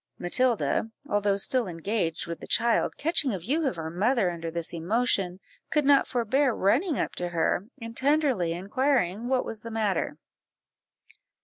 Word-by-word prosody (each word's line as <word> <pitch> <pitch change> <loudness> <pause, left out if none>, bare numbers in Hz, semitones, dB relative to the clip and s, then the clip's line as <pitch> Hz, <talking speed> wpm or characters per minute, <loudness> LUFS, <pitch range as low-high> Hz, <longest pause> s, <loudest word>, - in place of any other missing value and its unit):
Matilda, 220 - +1 0.2
although 205 -1 +1
still 245 +3 +1
engaged 170 0 -2
with 170 -1 -6
the - - -10
child, 235 +1 +2
catching 290 - +1
a - - -2
view 275 - 0
of 230 - -1
her 160 -1 -5
mother 200 +1 +1
under 165 -1 -5
this 170 0 -3
emotion, 190 +1 0 0.3
could 300 -2 +1
not 280 -1 +5
forbear 255 +2 +1
running 275 - +2
up - - -2
to 175 0 -2
her, 175 +3 0
and 230 -1 -8
tenderly 275 - +2
inquired 205 +2 0
what 250 +1 0
was 220 -1 -5
the 230 - -7
matter. 215 -5 -1
215 Hz, 155 wpm, -27 LUFS, 175-255 Hz, 0.3 s, not